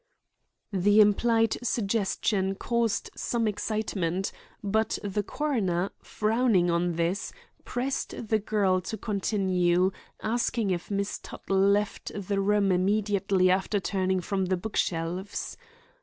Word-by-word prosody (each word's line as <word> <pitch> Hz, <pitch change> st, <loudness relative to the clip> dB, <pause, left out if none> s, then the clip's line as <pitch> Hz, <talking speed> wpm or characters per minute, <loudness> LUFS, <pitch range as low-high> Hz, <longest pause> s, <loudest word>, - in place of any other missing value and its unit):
The 205 Hz, +3 st, +4 dB
implied 225 Hz, +2 st, +4 dB
suggestion 200 Hz, -3 st, 0 dB
caused 235 Hz, 0 st, -1 dB
some 230 Hz, -2 st, -1 dB
excitement, 200 Hz, -4 st, -1 dB, 0.3 s
but 220 Hz, +2 st, +1 dB
the 205 Hz, 0 st, -1 dB
coroner, 200 Hz, -, -1 dB
frowning 215 Hz, -5 st, +2 dB
on 170 Hz, +1 st, +1 dB
this, 170 Hz, +4 st, -1 dB, 0.3 s
pressed 250 Hz, -3 st, -3 dB
the 220 Hz, -, +3 dB
girl 200 Hz, -3 st, +1 dB
to 220 Hz, +4 st, -5 dB
continue, 190 Hz, -3 st, +1 dB, 0.3 s
asking 230 Hz, -2 st, 0 dB
if 175 Hz, -1 st, -3 dB
Miss 200 Hz, 0 st, -2 dB
Tuttle 195 Hz, -, -5 dB
left 200 Hz, +2 st, +1 dB
the 200 Hz, 0 st, -2 dB
room 200 Hz, 0 st, +3 dB
immediately 195 Hz, 0 st, +2 dB
after 190 Hz, +2 st, +1 dB
turning 190 Hz, -1 st, 0 dB
from 190 Hz, +1 st, -1 dB
the 185 Hz, 0 st, 0 dB
book 210 Hz, +4 st, -6 dB
shelves. 175 Hz, +4 st, -2 dB
200 Hz, 115 wpm, -28 LUFS, 185-215 Hz, 0.3 s, The